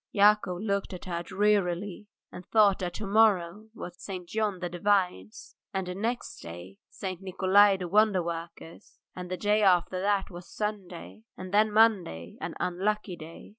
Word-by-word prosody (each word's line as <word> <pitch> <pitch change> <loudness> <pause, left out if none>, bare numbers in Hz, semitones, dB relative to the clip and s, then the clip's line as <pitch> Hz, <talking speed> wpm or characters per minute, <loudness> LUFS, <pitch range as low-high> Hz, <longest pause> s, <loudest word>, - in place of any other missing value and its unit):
Yakov 205 -3 +4
looked 200 -2 -2
at 180 - -8
her 170 -2 -3
drearily 195 0 0 0.2
and 180 - -9
thought 210 -3 +4
that 180 -2 -4
to 215 - -5
morrow 205 -1 +2
was 175 -3 -9
St. 185 -3 -7
John 215 -1 -1
the 180 0 -4
Divine's, 175 - -1 0.2
and 180 -1 -3
next 230 +5 -3
day 85 +3 -10
St. 185 -2 -6
Nikolay 195 +1 +4
the 180 -1 -5
Wonder 205 -1 +3
worker's, 170 +2 -8 0.2
and 180 -1 -7
the 185 - -3
day 210 +2 +2
after 185 -1 +3
that 200 0 0
was 175 0 -10
Sunday, 180 - -5 0.2
and 185 +1 -8
then 215 +1 +4
Monday, 195 - +2
an 165 +1 -5
unlucky 195 +2 -1
day. 165 0 -11
185 Hz, 160 wpm, -28 LUFS, 175-205 Hz, 0.2 s, Yakov